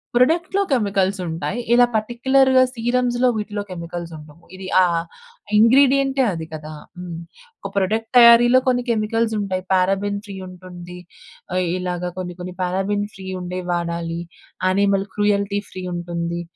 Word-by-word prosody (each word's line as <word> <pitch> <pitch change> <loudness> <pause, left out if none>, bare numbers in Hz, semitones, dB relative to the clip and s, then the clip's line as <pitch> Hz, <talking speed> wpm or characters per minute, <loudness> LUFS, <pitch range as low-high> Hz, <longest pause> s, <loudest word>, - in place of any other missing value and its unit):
ప్రొడక్ట్‌లో 335 +10 +2
కెమికల్సుంటాయి. 195 -4 -1
ఇలా 245 0 +6
పార్టిక్యులర్‌గా 260 +4 +3
సీరమ్స్‌లో, 245 +1 +1
వీటిలో 210 -1 -4
కెమికల్సుండవు. 170 -2 -8
ఇది 190 0 -8
ఆహ్, 170 -2 +1 0.5
ఇంగ్రీడియెంటే 270 +3 +4
అది 165 -1 -5
కదా! 155 0 -7 0.2
హ్మ్. 175 -2 -7 0.4
ఒక - - -7
ప్రొడక్ట్ 220 +4 0
తయారీలో 240 +1 +8
కొన్ని 245 -1 +2
కెమికల్సుంటాయి. 215 -4 -1
పారాబెన్ 195 +2 +1
ఫ్రీ 200 - -7
ఉంటుంది, 180 -1 -11 0.6
ఆహ్, 185 0 +1
ఇలాగ 180 -1 -3
కొన్ని 180 -1 -5
కొన్ని 180 0 -7
పారాబెన్ 195 +3 -1
ఫ్రీ 190 -1 -10
ఉండేవి 180 0 -5
వాడాలి. 170 -1 -3 0.5
యానిమల్ 195 +1 +2
క్రూయల్టీ 205 -1 +1
ఫ్రీ 185 - -7
ఉంటుంది. 170 0 -4
195 Hz, 120 wpm, -21 LUFS, 180-235 Hz, 0.6 s, తయారీలో